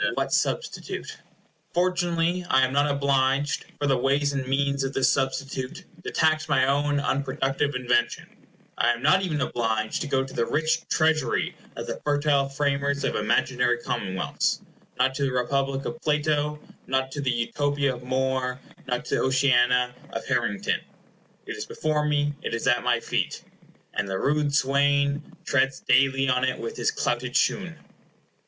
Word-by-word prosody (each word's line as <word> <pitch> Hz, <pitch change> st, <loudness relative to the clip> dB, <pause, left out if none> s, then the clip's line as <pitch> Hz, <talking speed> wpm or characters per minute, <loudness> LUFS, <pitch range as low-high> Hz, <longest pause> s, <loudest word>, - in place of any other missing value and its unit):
What -, -, -1 dB
substitute? -, -, -2 dB, 0.6 s
Fortunately 175 Hz, 0 st, +1 dB
I 130 Hz, 0 st, +5 dB
am 130 Hz, -, -4 dB
not 145 Hz, +1 st, +3 dB
obliged, 140 Hz, 0 st, +1 dB
for 145 Hz, -, 0 dB
the 135 Hz, -3 st, +2 dB
ways 140 Hz, +2 st, +1 dB
and 135 Hz, -2 st, -2 dB
means 140 Hz, +1 st, +1 dB
of 135 Hz, 0 st, -2 dB
this 130 Hz, -1 st, +3 dB
substitute, 135 Hz, -1 st, -2 dB, 0.2 s
to -, -, -4 dB
tax 155 Hz, -1 st, +1 dB
my 130 Hz, -2 st, +4 dB
own 145 Hz, +1 st, +1 dB
unproductive 140 Hz, 0 st, -1 dB
invention. 125 Hz, -1 st, -1 dB, 0.3 s
I 120 Hz, +1 st, +4 dB
am 120 Hz, +1 st, -8 dB
not 185 Hz, +6 st, +5 dB
even 160 Hz, -6 st, -1 dB
obliged 110 Hz, -4 st, -1 dB
to -, -, -3 dB
go 135 Hz, -1 st, +1 dB
to 135 Hz, -, -9 dB
the 115 Hz, -, 0 dB
rich 155 Hz, +1 st, 0 dB
treasury 155 Hz, -1 st, +1 dB, 0.2 s
of -, -, -5 dB
the -, -, -5 dB
fertile 145 Hz, -1 st, +2 dB
framers 140 Hz, 0 st, 0 dB
of -, -, 0 dB
imaginary 120 Hz, +3 st, +1 dB
commonwealths—not 120 Hz, +4 st, -2 dB
to 135 Hz, -, -5 dB
the 135 Hz, -, +1 dB
Republic 135 Hz, +2 st, -1 dB
of 160 Hz, 0 st, -5 dB
Plato, 150 Hz, 0 st, 0 dB, 0.3 s
not 130 Hz, 0 st, 0 dB
to 145 Hz, -, -4 dB
the 135 Hz, -, 0 dB
Utopia 140 Hz, +3 st, 0 dB
of 120 Hz, -, -11 dB
More, 130 Hz, 0 st, -1 dB, 0.3 s
not 125 Hz, 0 st, -2 dB
to -, -, -4 dB
the -, -, 0 dB
Oceana 125 Hz, -2 st, +3 dB, 0.2 s
of -, -, -5 dB
Harrington. 120 Hz, -6 st, 0 dB, 0.6 s
It -, -, -5 dB
is -, -, -4 dB
before 150 Hz, -1 st, -1 dB
me—it 145 Hz, -4 st, -1 dB
is 115 Hz, -, -4 dB
at 120 Hz, -, +3 dB
my 120 Hz, -1 st, +2 dB
feet, -, -, -2 dB, 0.5 s
"And 100 Hz, -, -2 dB
the 95 Hz, -, -1 dB
rude 145 Hz, +4 st, +1 dB
swain 140 Hz, +1 st, +2 dB, 0.2 s
Treads 135 Hz, -1 st, +1 dB
daily 135 Hz, +1 st, +3 dB
on 125 Hz, -1 st, +2 dB
it 130 Hz, 0 st, 0 dB
with 115 Hz, -, -5 dB
his -, -, +1 dB
clouted -, -, -2 dB
shoon." -, -, +1 dB
135 Hz, 160 wpm, -25 LUFS, 125-145 Hz, 0.6 s, I